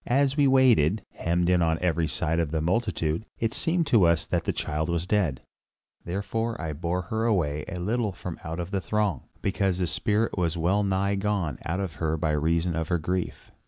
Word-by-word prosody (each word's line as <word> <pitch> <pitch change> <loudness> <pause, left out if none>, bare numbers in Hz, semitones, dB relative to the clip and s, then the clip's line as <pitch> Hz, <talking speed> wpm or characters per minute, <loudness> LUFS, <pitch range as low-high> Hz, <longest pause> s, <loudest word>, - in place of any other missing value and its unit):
As 135 +2 +2
we 145 -2 +4
waited, 115 - +4
hemmed 85 +1 0
in 90 -1 +3
on 80 -1 +2
every 85 -2 +1
side 80 +2 0
by 85 - +2
the 80 +1 -2
multitude, 85 -2 0
it 115 0 -1
seemed 170 +3 +1
to 115 -10 +5
us 85 -1 +2
that - - -1
the - - +1
child 80 +1 -2
was 85 0 0
dead, 90 - 0 0.6
therefore 110 +5 -2
I 80 -1 -3
bore 85 +4 -2
her 110 +1 +1
away 75 -10 +1
a 90 - -5
little 105 +4 0
from 90 -2 -7
out 80 -1 -4
the 100 -2 0
throng, 100 - 0 0.2
because 95 -2 +1
the 90 - 0
spirit 105 +6 0
was 85 -3 0
well 90 +5 +2
nigh 100 0 +1
gone 100 -5 -1
out 90 +3 -1
of 85 -6 -5
her 80 0 0
by 80 -1 0
reason 80 +3 +1
of 80 -1 -2
her 85 - +1
grief. 90 +3 -3
90 Hz, 200 wpm, -26 LUFS, 80-105 Hz, 0.6 s, to